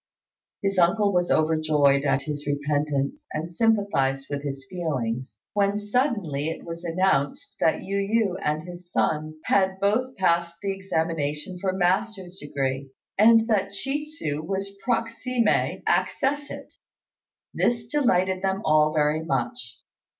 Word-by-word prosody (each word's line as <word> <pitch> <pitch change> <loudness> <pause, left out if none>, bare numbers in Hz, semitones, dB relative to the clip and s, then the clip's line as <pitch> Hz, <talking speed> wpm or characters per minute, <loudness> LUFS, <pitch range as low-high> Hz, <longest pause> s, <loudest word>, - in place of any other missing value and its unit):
His 195 -1 +1
uncle 200 +4 +3
was 175 -1 +1
overjoyed 155 -3 +3
at 135 -1 +2
his 145 -1 -5
repentance, 145 -1 -1
and 160 +3 -4
sympathised 200 - +1
with 140 0 -2
his 135 -2 -5
feelings, 130 - -3 0.2
when 200 0 +2
suddenly 205 - 0
it 165 - -6
was 170 0 -7
announced 170 -5 0
that 160 - +2
Yu 195 +1 -2
yü 200 -1 +1
and 150 +1 0
his 175 0 -11
son 155 0 0
had 190 -1 +2
both 245 +6 +1
passed 170 -2 +1
the 200 -1 -2
examination 165 -2 -2
for 190 +1 0
master's 190 0 0
degree, 135 -2 -3 0.3
and 225 +1 +6
that 200 -3 0
Chi 285 +2 -1
tsu 155 - -4
was 195 +4 -4
proximé 235 0 0
accessit. 290 +2 -1 0.8
This 235 -2 +1
delighted 190 -9 +1
them 195 +2 -1
all 155 0 +4
very 150 +1 +2
much. 120 -5 -3
175 Hz, 130 wpm, -25 LUFS, 150-200 Hz, 0.8 s, and